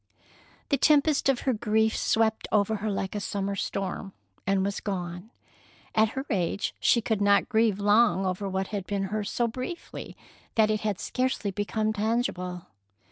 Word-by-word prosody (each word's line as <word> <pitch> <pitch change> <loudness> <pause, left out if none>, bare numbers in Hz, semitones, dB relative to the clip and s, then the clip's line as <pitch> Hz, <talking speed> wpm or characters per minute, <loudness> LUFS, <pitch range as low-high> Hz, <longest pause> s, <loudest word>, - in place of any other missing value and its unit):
The 280 - +3
tempest 295 -1 +4
of 265 -3 +2
her 260 - +1
grief 220 0 +1
swept 220 -1 +1
over 215 +1 +2
her 215 +2 -2
like 195 -1 -2
a 210 - -2
summer 200 0 -2
storm, 195 0 -3 0.3
and 195 -1 +2
was 200 0 -2
gone. 180 0 -4 0.6
At 220 0 +3
her 265 - -2
age 190 0 0
she 235 - +4
could 220 -2 -1
not 200 0 +4
grieve 220 -3 +3
long 205 -2 +4
over 185 +2 -2
what 190 0 -2
had 200 -3 -4
been 200 -1 -1
hers 210 -1 -1
so 240 - +1
briefly 255 +9 -6 0.4
that 215 -1 +4
it 215 - 0
had 210 -3 -1
scarcely 255 -5 -1
become 215 +2 -1
tangible. 205 -5 -1
210 Hz, 165 wpm, -27 LUFS, 195-225 Hz, 0.6 s, tempest